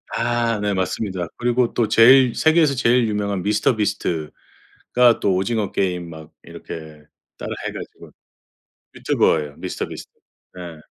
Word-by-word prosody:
아 115 -2 0
네. 105 -1 0
맞습니다. 95 -1 -3
그리고 120 0 0
또 115 -3 +1
제일 125 +3 +6
세계에서 160 -3 +3
제일 120 -1 +2
유명한 100 -3 -2
미스터 105 +3 +1
비스트가 85 -7 -4 0.7
또 95 -2 +1
오징어 105 +2 -1
게임 90 -3 -2
막 80 -1 -12
이렇게 80 -2 -10 0.3
따라 - - -7 0.2
해 - - -4
가지고 - - -10 0.8
유튜버예요. 75 -1 0
미스터 - - -5
비스트. - - -10 0.5
예. 85 -3 -9
105 Hz, 305 characters per minute, -21 LUFS, 90-120 Hz, 0.8 s, 제일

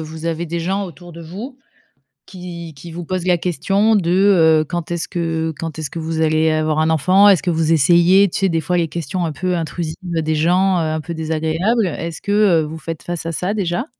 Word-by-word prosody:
vous 160 +1 -7
avez 165 +1 -2
des 170 +1 -3
gens 190 +4 -1
autour 175 0 -11
de 165 +1 -10
vous 215 - -8 0.7
qui 175 -3 -8
qui 165 +5 -11
vous 175 +1 -6
posent 185 +1 -3
la 180 -1 +3
question 195 +6 +1
de, 175 -4 +1 0.5
heu, - - -3
quand 175 -1 -4
est-ce 170 -1 -2
que 165 -2 -2
quand 165 -2 -5
est-ce 155 - -4
vous 160 0 -3
allez 155 0 +2
avoir 155 0 0
un 160 +1 +2
enfant? 185 +6 +4
Est-ce 185 -7 +4
que 175 - -2
vous 165 -1 +1
essayez? 175 +6 +5
Tu - - -3
sais? 195 - +3
Des 165 -1 0
fois 180 +4 -1
les 170 -1 +1
questions 170 +2 -3
un 160 - -2
peu 180 +4 -2
intrusives 160 0 -4
des 160 -3 -1
gens, 180 +4 +2
heu, 170 - +1
un 155 - -2
peu 170 +2 -6
désagréables, 160 +7 0
est-ce 165 0 -5
que, 200 - -3
heu, 200 -6 +4
vous 155 +1 -6
faites 165 0 -6
face 175 -2 -5
à 165 - -2
ça, 180 +5 -2
déjà? 180 +4 -1
170 Hz, 225 wpm, -19 LUFS, 160-180 Hz, 0.7 s, essayez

